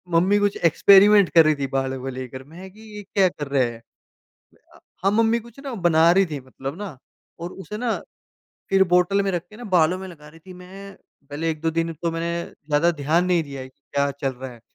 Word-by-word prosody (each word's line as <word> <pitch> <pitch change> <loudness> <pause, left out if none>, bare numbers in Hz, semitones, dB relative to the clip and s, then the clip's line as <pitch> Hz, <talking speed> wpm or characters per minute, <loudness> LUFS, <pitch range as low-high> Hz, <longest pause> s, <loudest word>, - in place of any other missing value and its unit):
Mummy 185 +5 +4
कुछ 205 0 0
experiment 200 +4 +6
कर 165 -1 +8
रही 155 - +3
थी 140 -1 -3
बालों 135 -1 -1
को 135 - -6
लेकर। 130 0 -7
मैं 170 +7 -12
कि 215 +3 -18 0.2
ये - - -6
क्या 195 -1 +2
कर 145 -4 -7
रहे 140 -2 +2
हैं? 115 0 -12 0.9
अ, - - -17 0.3
हाँ, 195 - +4
मम्मी 230 +1 +2
कुछ 235 +2 -15
ना 270 - -5
बना 165 0 +5
रही 195 +1 +3
थी 150 -4 -6
मतलब 135 +3 -8
ना 195 -9 -7 0.4
और 170 +1 -6
उसे 200 +2 -8
ना 235 0 -1 0.8
फिर 195 0 +5
बॉटल 180 +3 +3
में 195 - -1
रख 175 - -2
के 215 - -14
ना 245 - -10
बालों 170 +1 +3
में 190 - -7
लगा 155 -5 -13
रही 160 +2 -16
थी। 185 +3 -13
मैं 190 +2 -12 0.3
पहले 155 +3 -3
1-2 160 +1 -2
दिन 165 0 -1
तो 170 - -1
मैं 165 +1 -3 0.3
ज़्यादा 150 +3 +2
ध्यान 165 +5 +2
नहीं 175 -3 +2
दिया 140 -2 -8
कि - - -20 0.2
क्या 140 0 +1
चल 140 -1 -3
रहा 130 0 -9
है, 120 - -14
165 Hz, 225 wpm, -22 LUFS, 145-195 Hz, 0.9 s, कर